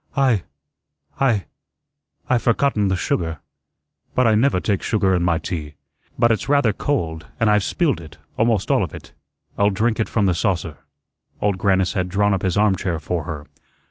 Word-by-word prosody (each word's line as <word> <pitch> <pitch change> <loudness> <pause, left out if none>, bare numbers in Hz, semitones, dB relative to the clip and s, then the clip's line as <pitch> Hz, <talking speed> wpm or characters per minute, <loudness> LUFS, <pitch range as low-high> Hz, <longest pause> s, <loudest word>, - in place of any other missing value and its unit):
"I 130 -7 +3 0.8
I 115 -9 +2 0.8
I've 125 -2 +2
forgotten 115 -3 +2
the 95 - +1
sugar." 80 -2 -1 0.8
"But 130 - +3
I 110 - +4
never 110 -2 +3
take 100 0 -1
sugar 100 -4 +1
in 90 - +2
my 85 -1 +2
tea." 75 -4 -5 0.4
"But 115 - +4
it's 115 +4 -1
rather 140 -7 +3
cold, 80 - -2
and 115 -2 +3
I've 105 -1 +3
spilled 150 - 0
it 80 -2 -13 0.2
almost 110 -3 +1
all - - +3
of - - -5
it." - - -12 0.5
"I'll 100 0 +4
drink 110 +4 0
it 110 - 0
from 105 -3 +1
the 95 - +3
saucer." 85 -3 -1 0.6
Old 100 -2 0
Grannis 95 -2 +2
had 90 -1 -1
drawn 105 +2 +2
up 95 - -1
his 95 -1 0
armchair 95 -4 +1
for 80 0 -3
her. 75 -3 -6
100 Hz, 175 wpm, -21 LUFS, 90-115 Hz, 0.8 s, I